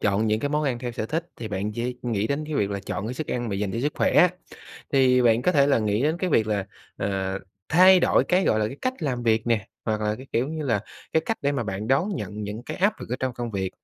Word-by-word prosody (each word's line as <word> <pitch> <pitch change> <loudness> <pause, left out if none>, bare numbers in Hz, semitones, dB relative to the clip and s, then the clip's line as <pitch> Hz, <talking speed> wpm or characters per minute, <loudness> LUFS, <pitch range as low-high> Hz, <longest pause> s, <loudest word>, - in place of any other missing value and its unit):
chọn 105 +2 +1
những 110 0 +1
cái 145 - -1
món 150 +1 0
ăn 130 -4 0
theo 120 0 -4
sở 110 - -3
thích, 165 +6 -2
thì 115 -2 -6
bạn 105 +1 -2
chỉ 120 +2 -3
nghĩ 110 -4 0
đến 140 +4 -2
cái 155 - -4
việc 100 -7 +1
là 100 0 -3
chọn 100 - -3
cái 120 - -4
sức 155 +3 -4
ăn 120 -2 -2
mà 100 - -2
dành 100 -1 -2
cho - - -2
sức 145 +3 0
khỏe - - +2
á, 180 - +7 0.6
thì 130 -2 +4
bạn 115 0 +4
có 180 - +2
thể 140 -4 +4
là 140 - +3
nghĩ 105 +1 0
đến 155 +4 +1
cái 185 0 -1
việc 110 -7 +3
là, 100 -3 -1 0.3
ờ, 95 0 -2 0.3
thay 185 +3 +7
đổi - - +3
cái, 185 +1 +2
gọi 110 - +3
là, 105 - +1
cái 115 - -6
cách 255 0 0
làm 125 -5 -1
việc 110 -1 +2
nè, 115 -4 +1 0.2
hoặc 110 -1 -1
là 105 0 0
cái, 130 +3 -11
kiểu 125 +5 +1
như 155 -1 -4
là, 115 -7 +1 0.3
cái 160 - +4
cách 225 - -1
để 140 0 +1
mà 135 -4 -1
bạn 100 +2 -4
đón 135 +9 +2
nhận 105 - -5
những 105 +3 -5
cái - - -6
áp 205 +3 +1
lực - - -7
ở 125 - 0
trong 130 -1 -1
công 120 -1 -4
việc. 95 -3 -2
120 Hz, 295 wpm, -25 LUFS, 105-145 Hz, 0.6 s, á